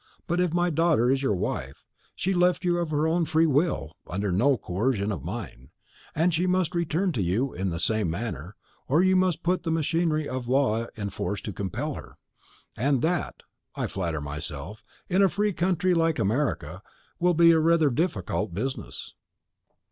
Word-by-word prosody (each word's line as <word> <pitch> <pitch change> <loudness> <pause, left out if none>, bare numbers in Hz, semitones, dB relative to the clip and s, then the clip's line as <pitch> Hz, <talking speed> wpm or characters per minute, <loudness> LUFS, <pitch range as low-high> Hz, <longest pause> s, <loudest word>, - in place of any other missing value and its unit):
But 175 +1 -1
if 180 -2 +2
my 175 +1 +1
daughter 155 -6 +3
is 135 0 +1
your 135 -7 +1
wife, 70 -6 -4 0.3
she 190 - -1
left 180 0 +2
you 175 -1 +2
of 170 -2 -2
her 155 +1 +1
own 170 +1 +2
free 160 +1 +3
will, 145 - 0
under 100 +2 -2
no 125 +9 +3
coercion 105 +2 -1
of 85 -10 -4
mine; 90 - -7 0.5
and 165 +3 +2
she 175 +3 +1
must 180 -1 +1
return 170 +2 0
to 120 - -2
you 105 +10 0
in 95 +2 -2
the 85 - -3
same 105 +2 +1
manner, 90 - -5 0.3
or 155 +7 +3
you 190 0 +4
must 185 -3 +1
put 180 +2 +1
the 165 - -3
machinery 160 -1 +1
of 130 -2 -4
the - - -2
law 115 -4 +2
in 100 -2 -4
force 95 +2 -3
to 105 - -5
compel 120 - -3
her. - - -10 0.6
And 135 +2 +1
that, 170 0 -1 0.3
I - - -1
flatter 85 -5 -3
myself, 75 +6 -7 0.2
in 190 +1 +2
a 195 - +5
free 205 +1 0
country 180 +1 +1
like 165 -1 +2
America, 120 +8 -1 0.4
will 175 0 +3
be 170 0 +7
rather 160 -1 +4
a - - -3
difficult 105 - -1
business." 130 +7 -4
145 Hz, 185 wpm, -26 LUFS, 100-170 Hz, 0.6 s, be